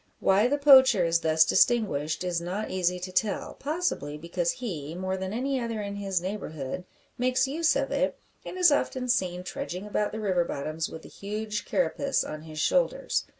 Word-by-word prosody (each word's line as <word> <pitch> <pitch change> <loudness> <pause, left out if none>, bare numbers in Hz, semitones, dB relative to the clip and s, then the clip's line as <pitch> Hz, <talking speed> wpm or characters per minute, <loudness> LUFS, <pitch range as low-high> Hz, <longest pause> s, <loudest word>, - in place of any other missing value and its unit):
Why 195 +4 +4
the 285 +3 +1
poacher 260 -9 +7
is 165 0 +2
thus 160 -1 +4
distinguished 185 -10 +2
it - - -2
is 170 -1 -1
not 185 +5 -4
easy 180 -1 0
to 185 +1 -6
tell; 205 +1 -1
possibly 285 - -2
because 170 +2 -1
he, 170 - -5
more 185 +1 -2
than 190 0 -4
any 260 +4 -1
other 230 -2 -3
in 200 -1 -4
his 195 -2 -1
neighbourhood, 180 -4 -5 0.3
makes 255 +1 +2
use 320 +4 +1
of - - -1
it, - - 0 0.3
and - - -7
is 360 -3 +6
often 260 -3 0
seen 180 -6 0
trudging 180 +1 -5
about 210 0 -1
the 220 - -5
river 190 -5 +1
bottoms 155 0 -3
with 160 - -9
the - - -12
huge 210 +1 -4
carapace 275 0 0
on 155 0 -6
his 155 -1 -10
shoulders. - - +1
195 Hz, 190 wpm, -27 LUFS, 170-250 Hz, 0.3 s, poacher